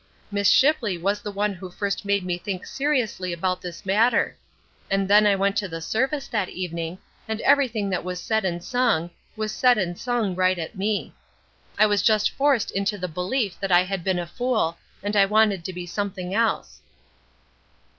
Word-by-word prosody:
Miss 200 0 +2
Shipley 265 - +3
was 200 +4 -1
the 205 - -5
one 205 +1 -1
who 185 0 -9
first 200 +3 -3
made 200 -2 +1
me 175 -1 -2
think 190 -1 -5
seriously 255 -10 -1
about 185 +2 -1
this 175 +2 -8
matter; 215 +6 +2 0.5
and 195 0 +1
then 210 +1 +6
I 200 - +4
went 195 +1 +1
to 200 -1 0
the 165 -2 -6
service 265 - -1
that 210 -5 -1
evening, 170 -1 -4 0.3
and 220 0 -3
everything 230 -8 +2
that 180 - -1
was 180 0 -4
said 220 +3 0
and 175 -2 -2
sung, 230 -10 +1 0.2
was 215 -1 -2
said 250 +1 +4
and 175 -4 -1
sung 235 -3 -1
right 185 0 +2
at 165 +3 -5
me. 205 +2 -2 0.6
I 215 - +6
was 205 -2 +2
just 215 0 +3
forced 275 -5 +1
into 200 +2 -1
the 180 -1 -3
belief 185 +5 -2
that 195 -1 -2
I 175 0 +6
had 190 -1 -4
been 190 0 +1
a 175 - -2
fool, 220 -3 -1 0.2
and 205 +1 -2
I 200 -1 +6
wanted 210 -3 +3
to - - -3
be 180 -1 -6
something 185 0 -4
else." 225 +1 0
200 Hz, 190 wpm, -24 LUFS, 180-220 Hz, 0.6 s, then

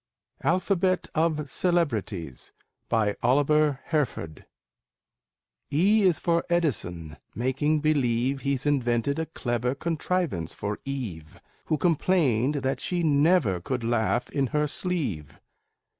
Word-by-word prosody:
ALPHABET 185 -1 +1
OF 155 -2 0
CELEBRITIES 115 - -2 0.4
BY 110 -3 +1
OLIVER 145 +3 +3
HERFORD 135 - -3 1.2
E 200 +9 +4
is 185 -5 +4
for 170 -1 +1
Edison, 90 - -1 0.2
making 140 +5 0
believe 135 -3 +1
He's 140 -1 -1
invented 135 0 +1
a 160 - -2
clever 125 -4 -2
contrivance 165 - -2
for 100 +1 -4
Eve, 105 - -6 0.3
Who 155 - 0
complained 150 -6 +2
that 135 0 -1
she 175 -1 -2
never 145 - +3
could 125 +6 -3
laugh 120 +1 0
in 140 -2 0
her 150 +4 0
sleeve. 145 - -3
140 Hz, 110 wpm, -26 LUFS, 115-160 Hz, 1.2 s, E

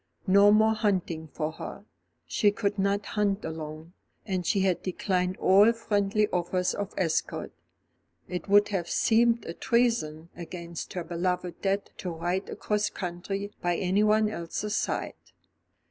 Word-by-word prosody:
No 200 +2 +6
more 220 +1 +5
hunting 185 -7 -1
for 155 +1 -3
her. - - -8 0.4
She 210 - +3
could 205 0 -2
not 200 +1 +1
hunt 205 -1 0
alone, 160 +1 -7 0.3
and 185 -4 -2
she 200 - +2
had 190 -2 +1
declined 185 0 -1
all 200 +4 +6
friendly 210 -2 +1
offers 180 +1 0
of 205 -1 -5
escort. 165 -4 -1 0.8
It 180 +2 -5
would 205 +1 +5
have 185 -4 -2
seemed 230 +1 +3
a 165 - -5
treason 225 -10 0
against 170 -1 -7
her 180 - -3
beloved 175 +1 -2
dead 195 +1 -1
to 180 - -4
ride 175 +3 -2
across 210 0 -1
country 195 +3 -4
by 175 0 +1
anyone 210 +4 +3
else's 210 +2 -3
side. - - -1
190 Hz, 140 wpm, -28 LUFS, 175-210 Hz, 0.8 s, No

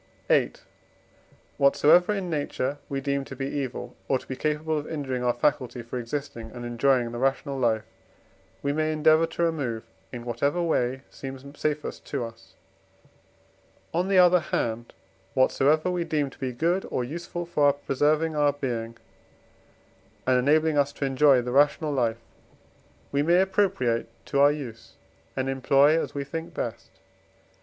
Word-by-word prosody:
VIII. - - +3 1.0
Whatsoever 150 +7 +5
in 195 -3 -2
nature 145 -3 -2
we 140 - -2
deem 140 0 -1
to 135 - -9
be 135 - -3
evil, 130 -3 -4
or 135 - +2
to - - -14
be 130 - -4
capable 155 +2 -1
of 145 - -8
injuring 135 -5 -3
our 125 - +3
faculty 125 -1 -1
for 120 +2 -5
existing 120 -2 -5
and 120 0 -6
enjoying 120 0 +2
the 120 - -5
rational 135 +2 0
life, 110 -3 +1 0.8
we 140 - 0
may 155 +1 0
endeavour 155 +1 +4
to 170 - -2
remove 140 -9 -1 0.3
in 120 -2 -7
whatever 140 +8 0
way 130 -6 0
seems 135 0 -8
safest 150 0 -3
to 140 -4 -3
us; 115 -5 -13 1.4
on 175 +3 +1
the 195 -1 +2
other 180 0 +7
hand, 115 -7 -2 0.4
whatsoever 150 +6 +3
we 175 -1 -1
deem 150 -4 -1
to - - -18
be 130 -1 -2
good 170 +9 0
or 125 - -1
useful 170 +5 -5
for 150 -4 +3
preserving 150 +3 0
our 145 -1 +3
being, 115 -5 -4 1.3
and 130 -1 +4
enabling 155 +3 +3
us 140 0 +2
to 140 - -3
enjoy 135 -1 +4
the 125 - -4
rational 145 +3 +3
life, 115 -4 +1 0.9
we 140 - +1
may 170 +4 +4
appropriate 190 - +1 0.2
to 140 - -1
our 145 +1 +7
use 120 -6 -7 0.4
and 130 0 0
employ 135 +3 +4
as - - -6
we 140 - -2
think 160 +4 -6
best. - - -4
140 Hz, 155 wpm, -26 LUFS, 125-155 Hz, 1.4 s, other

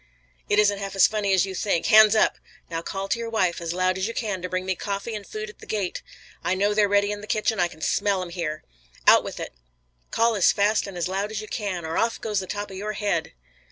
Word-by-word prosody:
"It 205 - +3
isn't 205 -1 +4
half 195 -1 -5
as 195 - +7
funny 210 -2 0
as 190 -1 +4
you 190 - -6
think. 190 -3 0
Hands 220 -1 +7
up! 215 - +3 0.3
Now 165 0 -2
call 195 +3 -4
to 235 - -1
your 230 0 -4
wife 185 -7 0
as 165 -1 -3
loud 185 +1 0
as 190 - 0
you 230 - -5
can 205 -6 -2
to 180 - -4
bring 185 0 -2
me 190 - 0
coffee 200 +4 -4
and 210 -2 -6
food 215 0 -5
at 210 - -13
the - - -13
gate! 200 -4 -2 0.4
I 185 - +1
know 205 +2 +2
they're 205 -1 +3
ready 205 0 +3
in 205 0 -5
the 210 - -10
kitchen. 215 0 0
I 175 - +3
can 160 -2 -15
smell 200 +2 +1
'em 180 - -7
here. 160 -3 -4 0.4
Out - - +7
with - - -7
it, - - -6 0.6
call 230 0 +2
as 200 -4 +4
fast 205 +1 +2
as - - -8
and 195 -2 -8
as 175 - -1
loud 195 +2 -2
as 215 -2 -4
you 215 - -7
can, 190 -7 -3
or 160 +1 -1
off 230 0 0
goes 210 -3 -1
the 190 - -6
top 205 +1 -4
of 190 - -7
your 210 +2 -3
head!" 200 -5 -1
200 Hz, 270 wpm, -25 LUFS, 185-215 Hz, 0.6 s, as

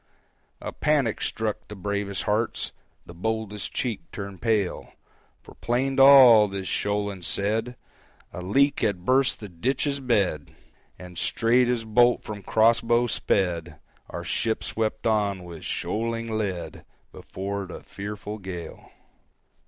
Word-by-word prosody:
A - - -5
panic 145 -7 +1
struck 110 -2 -3
the 105 - -8
bravest 100 0 -3
hearts, 110 +2 -1 0.3
The 85 - -11
boldest 105 +2 -3
cheek 120 -4 -2
turned 100 -2 -7
pale; 110 -5 -1 0.5
For - - -14
plain 130 +3 -1
to - - +5
all, 130 -6 +9
this 95 -1 -5
shoaling 100 0 -1
said 110 +7 -1 0.6
A 90 - -6
leak 140 +10 +2
had 95 -4 -1
burst 130 +2 +3
the 105 - -7
ditch's 130 - -1
bed! 100 - 0 0.4
And, 90 -2 -9
straight 120 +2 +2
as 120 -2 -1
bolt 120 +2 +3
from 105 -1 -7
crossbow 115 +3 +3
sped, 85 -8 -1 0.3
Our - - -6
ship 110 -1 -1
swept 110 -1 -2
on, 105 -4 +1
with 85 -2 -10
shoaling 115 +1 -2
lead, 90 -7 -4 0.3
Before 100 +1 -5
the 90 - -9
fearful 105 +1 -7
gale! 90 -3 -8
105 Hz, 130 wpm, -25 LUFS, 95-115 Hz, 0.6 s, all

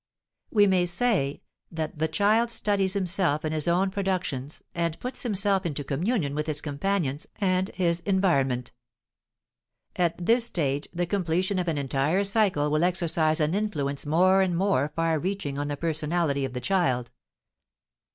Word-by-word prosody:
We 205 -2 +5
may 185 -2 +2
say 175 - 0 0.3
that 160 -2 -5
the 160 - +2
child 210 +8 +2
studies 200 -4 0
himself 180 -6 0
in 155 - -1
his 155 0 0
own 185 +3 +2
productions 180 -8 -3
and 170 -1 -2
puts 250 +1 -5
himself 200 -4 +1
into 150 -5 -3
communion 150 - -1
with 150 +1 -2
his 150 -2 0
companions 150 -1 -2
and 185 -2 0
his 170 -2 +1
environment. 140 -10 +1 1.2
At 175 -2 0
this 230 +3 +4
stage 145 - -1
the 175 +1 -1
completion 185 +1 0
of 180 - -2
an 160 -3 0
entire 140 +7 0
cycle 195 -8 +1
will 155 +2 +2
exercise 170 -3 +1
an 155 +1 +1
influence 150 -10 -2
more 185 +6 +4
and 180 -3 +1
more 170 -7 +1
far 165 -1 +1
reaching 170 -6 -3
on 145 - -2
the 145 -1 -3
personality 155 -2 0
of 130 - -6
the 125 - -4
child. 130 -11 0
170 Hz, 155 wpm, -26 LUFS, 150-195 Hz, 1.2 s, We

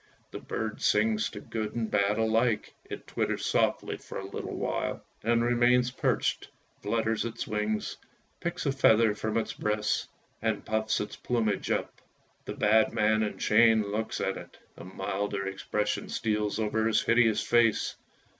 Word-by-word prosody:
The - - -6
bird 110 0 -4
sings 110 0 +2
to 105 - -8
good 110 +1 -4
and 115 -2 -2
bad 105 +1 +2
alike! 115 0 +1
It - - -8
twitters - - -2
softly - - +1
for - - -9
a 95 - -5
little 100 - -6
while, - - -2 0.2
and 115 +1 +2
remains 120 +1 +3
perched, - - 0 0.3
flutters 110 +1 0
its 115 -1 -4
wings, 105 0 -2 0.4
picks 170 0 -3
a 140 - +2
feather 115 -5 +4
from 110 +1 -2
its 115 - -1
breast, 105 0 -1 0.3
and - - -1
puffs 110 0 0
its 105 0 -5
plumage 115 -4 -1
up. - - -2 0.4
The - - -5
bad 110 +1 +3
man 110 +1 +2
in 105 -1 -2
chains 110 0 +4
looks 105 +2 -3
at 95 - -1
it, - - -11 0.2
a - - -10
milder 95 +2 -3
expression 105 +2 -2
steals 105 -2 -1
over 110 0 0
his 115 - +2
hideous 115 -2 +3
face. 115 -2 +2
110 Hz, 155 wpm, -29 LUFS, 105-115 Hz, 0.4 s, feather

